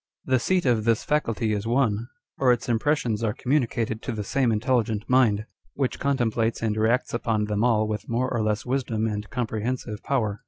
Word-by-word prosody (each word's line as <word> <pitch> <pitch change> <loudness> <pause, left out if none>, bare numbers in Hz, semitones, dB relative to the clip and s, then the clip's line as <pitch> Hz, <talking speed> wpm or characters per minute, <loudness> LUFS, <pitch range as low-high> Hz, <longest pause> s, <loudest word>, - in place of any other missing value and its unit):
The 130 -1 +2
seat 180 +6 +1
of 120 -4 +2
this 115 -1 +2
faculty 115 -7 0
is 105 +1 -2
one, 115 -3 +1 0.3
or 130 -2 +5
its 120 0 0
im 115 -2 +1
pressions 120 -6 0
are 105 -2 0
communicated 120 -5 0
to - - -4
the 105 -2 -3
same 125 +3 +1
intelligent 110 -1 0
mind, 115 -5 +3 0.3
which 135 -3 -1
contemplates 120 -5 0
and 110 -2 +1
reacts 110 +3 +1
upon 115 -2 0
them 105 +1 -1
all 110 -3 +3
with 105 -2 -4
more 120 +2 +1
or 115 - 0
less 105 -1 -1
wisdom 125 -4 -1
and 105 -1 -3
comprehensive 115 -1 -3
power. 110 -7 -1
115 Hz, 190 wpm, -25 LUFS, 110-125 Hz, 0.3 s, or